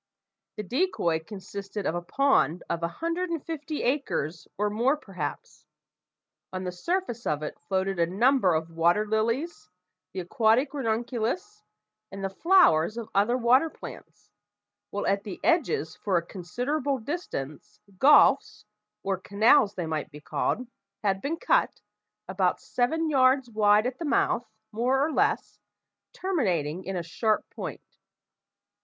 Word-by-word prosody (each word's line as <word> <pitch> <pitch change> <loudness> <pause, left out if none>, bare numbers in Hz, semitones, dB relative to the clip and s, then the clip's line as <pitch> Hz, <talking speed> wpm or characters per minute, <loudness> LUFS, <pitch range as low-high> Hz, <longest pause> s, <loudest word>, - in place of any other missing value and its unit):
The 210 - -4
decoy 210 - 0
consisted 200 +2 -7
of - - 0
a 175 - -2
pond 180 - +2
of 170 - -2
a 170 - +1
hundred 335 - -3
and 330 -4 -3
fifty 310 -2 -4
acres, 175 - -1
or 210 +1 0
more 245 +7 +2
perhaps. 255 - -7 0.9
On 185 0 -4
the 180 - -3
surface 240 - -3
of 150 0 -1
it 150 - -6
floated 190 -1 -1
a 170 - +3
number 200 -1 +3
of 160 +1 -2
water 170 +6 +2
lilies, 220 - -1 0.4
the 190 - -4
aquatic 225 - +2
ranunculus, 240 - -2 0.5
and 195 0 -7
the 195 - -2
flowers 230 - +4
of 230 -2 -6
other 210 +5 +3
water 255 +6 +4
plants, - - -12 0.6
while 205 - -3
at 200 0 +1
the 200 -4 -7
edges 305 - +1
for 190 -4 0
a 170 - -2
considerable 255 - -2
distance 210 - -6 0.2
gulfs 295 +2 +5 0.4
or 195 -1 -1
canals, 205 +2 +4
they 175 - -3
might 155 -2 -3
be 150 -1 -11
called 250 +10 -2 0.4
had 195 -2 +1
been 320 +4 -2
cut, - - +1 0.5
about 190 -1 0
seven 320 +7 0
yards 260 -3 +3
wide 210 0 +4
at 255 0 -3
the 335 - -3
mouth, 290 - +1 0.2
more 245 +5 +1
or 320 - -2
less, 420 +7 0 0.5
terminating 185 - -1
in 190 +1 -4
a 175 - -2
sharp 215 +6 0
point. - - -7
220 Hz, 145 wpm, -27 LUFS, 185-275 Hz, 0.9 s, gulfs